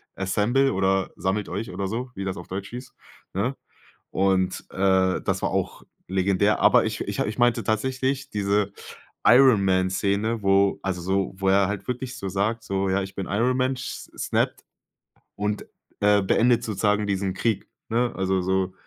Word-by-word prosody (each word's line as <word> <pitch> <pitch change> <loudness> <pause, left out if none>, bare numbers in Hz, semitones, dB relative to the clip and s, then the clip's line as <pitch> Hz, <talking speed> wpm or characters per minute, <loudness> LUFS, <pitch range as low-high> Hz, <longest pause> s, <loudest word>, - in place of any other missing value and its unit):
„Assemble" 105 +8 +1
oder 95 0 +1
sammelt 95 +2 -1
euch 100 +3 -4
oder 95 +2 -3
so, 120 +5 -4
wie 100 - -4
das 95 0 -3
auf 90 - -9
Deutsch 95 +1 -5
hieß, 125 +1 -9 0.4
ne? 115 +8 -1 0.6
Und, 95 -1 +1
äh, 95 -1 +2
das - - -1
war - - +1
auch - - -2 0.3
legendär, 95 +2 +2
aber - - +5
ich - - -3
ich - - -4
ich 105 +3 -1
meinte 120 -1 +3
tatsächlich 130 +5 -1
diese 100 0 0 0.6
Iron 120 -5 +6
Man 95 0 +2
Szene, 105 +4 0
wo 95 0 +3
also 95 -2 -2
so 95 +2 -1
wo 95 - -2
er 95 0 +4
halt 100 +3 -4
wirklich 125 0 -4
so 100 -6 -4
sag 105 +4 -1
so: 95 -2 -1
„Ja, 95 +1 +1
ich 95 0 -9
bin 95 - -3
Iron 120 +6 +1
Man", 130 0 0
sch - - -7
snappt - - -1 0.7
und, 105 0 -2 0.4
äh, 105 0 +4
beendet 120 +4 +3
sozusagen 105 -1 0
diesen 95 -1 -1
Krieg, 110 0 -1 0.2
ne, 120 +2 +1
also 95 0 0
so 95 0 0
100 Hz, 170 wpm, -24 LUFS, 95-115 Hz, 0.7 s, Iron